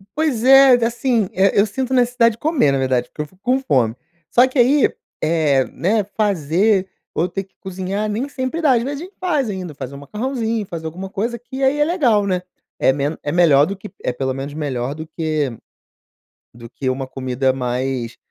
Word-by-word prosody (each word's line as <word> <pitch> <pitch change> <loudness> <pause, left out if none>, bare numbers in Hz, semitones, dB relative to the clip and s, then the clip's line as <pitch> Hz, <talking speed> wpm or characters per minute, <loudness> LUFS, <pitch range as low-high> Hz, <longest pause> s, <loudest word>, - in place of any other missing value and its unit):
Pois 290 -7 0
é, 270 +1 +8
assim, 235 -3 0
eh, 195 +1 +3
eu 200 - +5
sinto 255 +5 -3
necessidade 245 -2 +3
de 220 - -14
comer 295 - +2
na 135 - +1
verdade, 130 -2 0
porque - - -6
eu - - -3
fico 185 +4 -27
com 255 +4 +1
fome. 120 - +1 0.4
Só 245 +2 +6
que 260 - -6
aí, 270 +4 +5 0.3
eh, 155 -5 +2
né, 210 +4 0
fazer, 195 0 +2 0.3
ou 170 - +1
ter 195 +1 -4
que 190 - -29
cozinhar 190 +2 -3
nem 225 +6 -2
sempre 265 +5 -3
dá. 285 -5 +4
Às 235 - +2
vezes 280 +3 -4
a - - -5
gente 380 - -17
faz 305 - 0
ainda, 185 -5 -5
faz 130 -2 -6
um 140 - -9
macarrãozinho, 225 - -3
faz 170 -3 -7
alguma 185 +4 -6
coisa, 230 +5 -2
que 260 +3 -6
aí 270 +3 +2
é 295 - +4
legal, 250 - +2
né. 185 -2 0 0.4
É 130 - +4
meno 145 +3 -2
é 145 - -2
melhor 155 -5 +5
do 195 +5 -4
que 200 +2 -11
é 125 - -1
pelo 130 +1 -2
menos 135 +2 -6
melhor 140 -3 -3
do 155 +1 -7
que 155 -3 -2 1.0
do 115 0 -12
que 130 +1 -3
uma 130 +1 -3
comida 130 0 -1
mais, 125 -1 -2
190 Hz, 205 wpm, -20 LUFS, -, 1.0 s, é